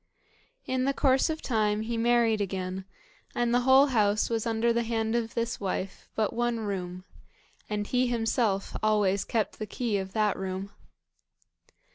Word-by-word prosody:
In 255 0 0
the 275 0 0
course 270 +2 +3
of 315 0 -3
time 215 -3 +1
he 230 +2 -3
married 230 -2 +3
again, 190 -1 -3 0.5
and 240 0 +1
the 245 - +4
whole 265 +2 +6
house 210 0 +2
was 230 0 -1
under 230 +1 +2
the 235 - +1
hand 225 -1 -1
of 230 -1 -2
this 235 0 -2
wife 195 -1 -4
but 215 -2 0
one 240 -1 0
room, 185 -3 -4 0.7
and 210 -1 -2
he 250 +3 +1
himself 225 -4 0
always 205 -3 +2
kept 220 -3 -2
the 215 - -4
key 220 -1 -1
of 190 0 -6
that 215 -2 +2
room. 190 +1 -4
220 Hz, 160 wpm, -28 LUFS, 200-235 Hz, 0.7 s, whole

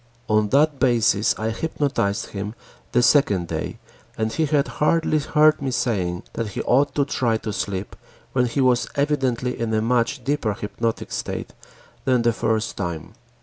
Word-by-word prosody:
On 105 -1 +2
that 145 +2 +3
basis 115 -4 +3
I 110 +1 -1
hypnotized 130 -6 -1
him 105 +2 -5 0.4
the 125 - +3
second 105 - +3
day - - -4 0.4
and 110 0 -1
he 160 -1 +1
had 145 -1 +2
hardly 155 0 +1
heard 150 +1 +3
me 135 - -1
saying 95 -8 -1
that 115 - -2
he - - -3
ought 135 +2 +2
to 140 - +2
try 120 -5 0
to 110 -1 -5
sleep 100 -1 -3 0.4
when 125 -1 +2
he 135 +4 -1
was 125 -2 +3
evidently 135 -4 0
in 115 -1 -1
a - - +2
much 125 +3 +1
deeper 125 -6 0
hypnotic 115 +3 -3
state - - -4 0.5
than 125 -3 +3
the 120 0 +3
first 110 0 -1
time. 85 -5 -4
120 Hz, 165 wpm, -23 LUFS, 110-140 Hz, 0.5 s, that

